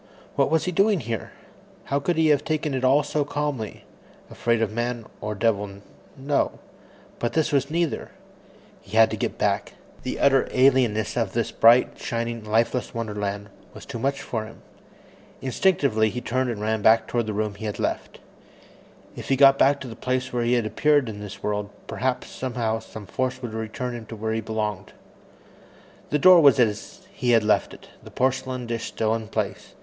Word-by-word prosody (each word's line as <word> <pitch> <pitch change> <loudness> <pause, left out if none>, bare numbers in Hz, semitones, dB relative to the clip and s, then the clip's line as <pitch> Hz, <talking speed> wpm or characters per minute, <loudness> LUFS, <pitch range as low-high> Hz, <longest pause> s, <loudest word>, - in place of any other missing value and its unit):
What - - +2
was 160 0 +1
he 180 - -1
doing 195 +1 +3
here? 115 -2 -4 0.5
How 140 - -1
could 175 +4 0
he 160 -1 +4
have 145 -1 +3
taken 155 -2 -1
it 130 -1 -2
all 135 +3 +4
so 145 +1 -1
calmly. 145 -6 -4 0.5
Afraid 115 -1 0
of 110 - -1
man 120 0 -3 0.2
or 105 0 -3
devil, 105 -2 0 0.4
no 140 +1 -1 0.6
but 120 - -2
this 160 -2 +1
was 140 -1 +1
neither. 170 0 -1 0.7
He 100 +3 -5
had 115 0 +6
to - - -1
get - - -3
back. - - 0 0.3
The - - -4
utter 135 -1 +4
alienness 125 -5 +3
of - - -1
this - - -1
bright, 120 +2 +5
shining, 115 -1 -3
lifeless 115 +4 0
wonderland 105 -3 -3 0.3
was - - -10
too 125 -4 -6
much 135 +3 -1
for 110 -2 -3
him. 110 - -14 0.8
Instinctively, 130 - +2
he 125 - -4
turned 130 +1 -1
and 110 -3 -4
ran 110 0 0
back 110 +2 +5
toward 120 -2 -1
the 105 - -2
room 105 0 -1
he 105 +2 -8
had 105 - -3
left. - - -3 1.0
If - - -8
he 135 - +4
got 135 0 +6
back 140 +1 +4
to 130 - -6
the 115 - -8
place 130 +1 -2
where 120 - 0
he 120 +1 +1
had 120 -3 +2
appeared 145 +4 +2
in 105 -1 -7
this 100 -1 -9
world, 105 -1 -2 0.2
perhaps 130 -1 -2
somehow 120 -3 -2
some 110 -1 -10
force 130 +4 -2
would 115 -3 -5
return 110 +3 -4
him 115 -2 -8
to 115 - -7
where 110 +1 -2
he 110 - -1
belonged. 105 -3 -4 1.2
The 150 - +2
door 180 +2 +8
was 140 -2 +6
as 110 -3 0
he 125 -3 -2
had 115 -2 +5
left 105 - +2
it, - - -14
the - - -12
porcelain 130 -1 -1
dish 115 -1 -3
still 110 0 -1
in 110 -1 -3
place. - - -4
120 Hz, 190 wpm, -24 LUFS, 110-135 Hz, 1.2 s, door